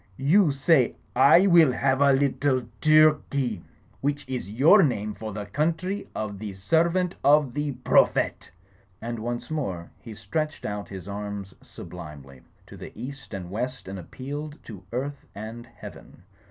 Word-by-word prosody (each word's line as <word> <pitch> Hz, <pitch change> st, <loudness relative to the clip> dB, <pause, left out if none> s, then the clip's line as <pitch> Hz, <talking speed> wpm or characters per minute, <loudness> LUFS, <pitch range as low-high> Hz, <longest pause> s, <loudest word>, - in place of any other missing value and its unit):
"You 160 Hz, +4 st, +4 dB
say, 140 Hz, -2 st, +3 dB, 0.2 s
*I 145 Hz, +9 st, +6 dB
will 170 Hz, -7 st, +6 dB
have 130 Hz, +2 st, +1 dB
a 140 Hz, 0 st, +6 dB
little 135 Hz, -1 st, +1 dB, 0.2 s
Turkey,' 150 Hz, -6 st, +3 dB, 0.4 s
which 145 Hz, 0 st, -2 dB
is 130 Hz, -6 st, -4 dB
your 145 Hz, -, +6 dB
name 105 Hz, -, 0 dB
for 110 Hz, +1 st, -7 dB
the 105 Hz, 0 st, -5 dB
Country 165 Hz, -, -2 dB
of 105 Hz, -2 st, -4 dB
the 105 Hz, -2 st, -6 dB
Servant 170 Hz, -, +1 dB
of 145 Hz, -3 st, +4 dB
the 145 Hz, -1 st, -2 dB
Prophet 125 Hz, 0 st, +2 dB, 0.3 s
!" 95 Hz, -, -32 dB, 0.2 s
And 115 Hz, 0 st, -4 dB
once 120 Hz, +5 st, -4 dB
more 95 Hz, -, -4 dB
he 110 Hz, -2 st, -10 dB
stretched 155 Hz, +10 st, -3 dB
out 105 Hz, -3 st, -4 dB
his 95 Hz, -2 st, -8 dB
arms 100 Hz, -1 st, -6 dB
sublimely 70 Hz, -4 st, -11 dB, 0.2 s
to -, -, -13 dB
the -, -, -9 dB
east 135 Hz, +3 st, -8 dB
and 90 Hz, -3 st, -6 dB
west 125 Hz, +4 st, -4 dB
and 95 Hz, 0 st, -6 dB
appealed 145 Hz, -, -7 dB
to 105 Hz, -5 st, -10 dB
earth 140 Hz, +3 st, -4 dB
and 110 Hz, +3 st, -8 dB
heaven. 115 Hz, -5 st, -13 dB
130 Hz, 155 wpm, -25 LUFS, 105-150 Hz, 0.4 s, I